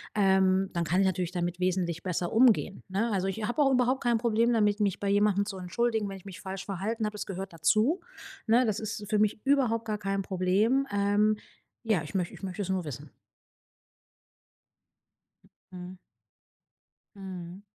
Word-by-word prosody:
Ähm, 190 -1 +3
dann 170 -1 -1
kann 180 +5 +2
ich - - +3
natürlich 180 -1 -1
damit 175 0 -2
wesentlich 180 -3 -1
besser 180 -1 -2
umgehen, 225 -4 +3
ne? 205 +5 -1
Also, 190 -2 0
ich 210 +3 -3
hab 240 +7 -3
auch 275 -2 +4
überhaupt 255 +1 +2
kein 240 -1 +3
Problem 235 +1 +2
damit, 210 -2 +2
mich 200 -3 0
bei 200 - 0
jemandem 200 0 +3
zu 200 -2 -6
entschuldigen, 220 +4 -1
wenn 195 - -6
ich 185 - -15
mich 195 0 -9
falsch 195 -1 -6
verhalten 210 +4 -2
hab. 210 - -3
Es 210 - -5
gehört 195 0 -6
dazu, 215 - +2 0.5
ne? 235 +3 +4
Das 215 -3 -1
ist 215 -1 -5
für 215 - +2
mich 210 0 +1
überhaupt 255 -5 +2
gar 215 -1 -2
kein 195 -1 -2
Problem. 200 +9 +1
Ähm. 205 +1 +2 0.5
Ja, 210 -7 +2
ich 150 +6 -10
möch 180 -2 -1
ich - - -13
möchte 190 +1 -4
es 190 - -6
nur 190 -1 0
wissen. 145 0 -8 2.6
Mhm. 180 0 -8 1.2
Mhm. 185 -1 -8
200 Hz, 175 wpm, -28 LUFS, 185-220 Hz, 2.6 s, auch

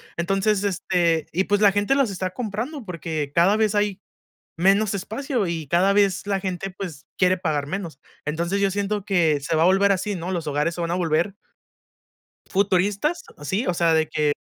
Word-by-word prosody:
Entonces, 195 +4 +1
este, 175 -4 +1
y 190 +4 +1
pues 205 0 +2
la 205 -1 +6
gente 205 +6 +2
las 275 -6 +2
está 185 -1 -3
comprando, 230 +7 -5
porque 160 -5 -4
cada 185 +5 +4
vez 215 -1 +1
hay, 205 -1 0 0.6
menos 195 +4 +3
espacio 220 +4 -2
y 165 -3 -3
cada 185 +6 +3
vez 200 -1 +2
la 200 -1 0
gente, 190 0 -4
pues 180 -6 -8
quiere 185 0 +3
pagar 155 -5 -1
menos. 170 -3 -5 0.3
Entonces 170 +6 -1
yo 200 -1 +2
siento 205 +1 -2
que 165 -7 +2
se 160 +4 -1
va 160 - +3
a - - +5
volver 195 +3 +4
así, 200 +1 0
¿no? 175 +2 -4
Los 170 -3 -3
hogares 150 +3 0
se 175 - -4
van 170 - -2
a - - +1
volver 170 +2 0 1.1
futuristas, 200 - +1 0.2
sí, 190 - -1
o 180 - +1
sea, 165 -1 +3
de 160 -1 +2
que 150 -1 +1
190 Hz, 190 wpm, -23 LUFS, 170-205 Hz, 1.1 s, la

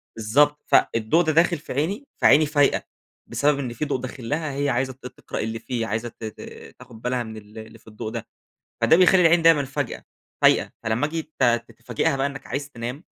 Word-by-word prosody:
بالضبط 145 +7 +2
فالضوء 115 +10 +3
ده 160 - +1
داخل 170 +1 +3
في 150 - -8
عيني، 195 - -2
فعيني 155 +2 +5
فايقة 145 -1 +2 0.4
بسبب 145 0 +1
إن 125 -3 -4
في 150 - -3
ضوء 145 - -1
داخل 125 -2 -7
لها 155 0 -1
هي 145 +1 -1
عايزة 130 +1 -1
ت 130 0 -19
تقرأ - - -8
اللي 110 +1 -3
فيه 120 -3 -3
عايزة 115 +3 -3
ت 115 - -16
ت 110 - -7 0.4
تاخد 115 -2 -14
بالها 125 0 -1
من 110 -1 -9
ال 105 +1 -14
اللي 110 +1 -10
في - - -28
الضوء 110 +1 -7
ده. - - -6 0.5
فده 160 - +5
بيخلّي 185 0 +5
العين 165 0 +5
دايمًا 165 -4 +5
فجأة 140 -1 -4 0.4
فايقة - - +4
فلما 110 +6 0
آجي 160 +1 -3
ت 155 - -2 0.3
تفاجئها 120 +5 -1
بقى 135 +1 0
إنّك 135 -1 -7
عايز 140 +1 -4
تنام 125 +7 -6
135 Hz, 205 wpm, -23 LUFS, 115-150 Hz, 0.5 s, فعيني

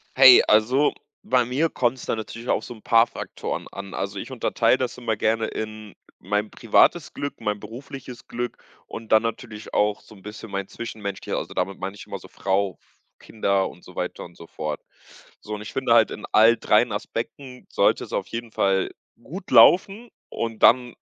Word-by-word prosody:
Hey. - - +9
Also, 125 +7 +4 0.3
bei 125 -1 +3
mir 135 +7 0
kommt's 125 0 -1
da - - -1
natürlich 115 +2 -7
auf - - +1
so 120 - -8
'n 110 - -18
paar 115 0 +5
Faktoren - - -6
an. 100 0 -8
Also, 100 0 -3
ich - - -7
unterteile 125 0 +1
das 125 -1 -3
immer 115 -3 -1
gerne 110 +1 +1
in 110 -2 -7 0.2
mein 105 +3 -2
privates 145 +8 +3
Glück, 145 -3 -5
mein 105 -2 -2
berufliches 125 +3 -10
Glück 120 0 -4 0.3
und 115 -1 -9
dann 110 0 +6
natürlich 110 -2 -6
auch 105 0 +1
so - - -17
'n 100 - -16
bisschen 105 +1 -9
mein 100 0 -3
Zwischenmenschlicher 105 -4 -5
also, - - -8
damit 100 - -2
meine 95 +1 -5
ich 100 - -11
immer - - -6
so - - -14
Frau, 95 0 -1 0.4
Kinder 100 -3 0
und - - -16
so - - -15
weiter - - -4
und 85 -1 -13
so 85 - -11
fort. 75 -2 -5 0.6
So, 105 - -5
und 105 - -8
ich 105 - -9
finde 130 -3 +1
halt, 115 -1 +5
in - - -7
all 115 +2 +6
3 110 +2 +3
Aspekten 125 +5 -6
sollte - - +2
es - - -10
auf - - -2
jeden 115 0 -6
Fall 95 -2 +1 0.3
gut 185 +6 -9
laufen. 200 +6 +5 0.2
Und 115 -1 -4
dann 125 -1 +5
110 Hz, 190 wpm, -24 LUFS, 105-125 Hz, 0.6 s, Hey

